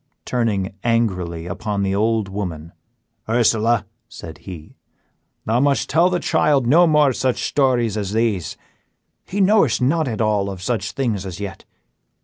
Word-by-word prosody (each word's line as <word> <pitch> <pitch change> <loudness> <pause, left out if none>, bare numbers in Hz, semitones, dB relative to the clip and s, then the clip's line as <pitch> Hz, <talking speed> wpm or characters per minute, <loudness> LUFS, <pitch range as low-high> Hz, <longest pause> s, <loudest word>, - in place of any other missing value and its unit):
Turning 105 -6 -1
angrily 90 -8 -1
upon 100 +3 -3
the 95 0 0
old 110 +1 +1
woman, 90 -5 -5 0.6
"Ursela," 115 -1 +2 0.2
said 80 -7 -10
he, 85 -5 -10 0.7
"thou 115 +3 +1
must 140 +1 +1
tell 170 +3 +4
the 180 -1 0
child 150 -6 +2
no 170 +8 +5
more 150 -4 +4
such 130 0 -1
stories 125 -6 +1
as 105 -2 -3
these; 110 -6 -1 0.7
he 200 - -4
knowest 195 - +3
not 150 +4 +1
at 110 -4 -3
all 105 -3 +1
of 95 -2 -7
such 95 -1 -2
things 110 -5 -1
as 95 -2 -7
yet. 100 -2 -7
110 Hz, 145 wpm, -20 LUFS, 95-130 Hz, 0.7 s, no